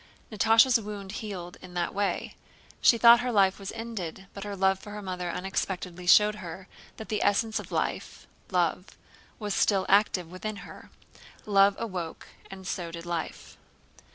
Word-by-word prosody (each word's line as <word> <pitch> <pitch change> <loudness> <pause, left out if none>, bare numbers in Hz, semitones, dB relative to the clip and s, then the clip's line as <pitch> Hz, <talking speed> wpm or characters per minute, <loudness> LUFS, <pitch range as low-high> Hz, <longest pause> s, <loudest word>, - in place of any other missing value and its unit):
Natásha's 225 +3 +5
wound 205 -2 -7
healed 195 -5 -6
in 180 -1 -12
that 175 -1 -1
way. 200 0 -2 0.5
She 235 - +6
thought 235 +1 +8
her 245 0 -1
life 195 -3 +3
was 195 -1 -6
ended, 195 -6 -6
but 200 - -7
her 205 -1 -5
love 190 0 +2
for 205 - -11
her 210 - -6
mother 180 -2 -4
unexpectedly 180 -1 -4
showed 210 +3 +7
her 185 0 -8 0.3
that 220 - -9
the 210 - -1
essence 215 +2 +1
of - - -10
life—love—was 185 +3 -4
still 195 -2 +2
active 190 -4 +2
within 215 +4 -5
her. - - -12 0.6
Love 200 -1 +4
awoke 185 -8 -5 0.2
and 190 -1 -10
so 175 -2 -3
did 170 0 -8
life. 170 -2 -5
195 Hz, 155 wpm, -28 LUFS, 180-210 Hz, 0.6 s, thought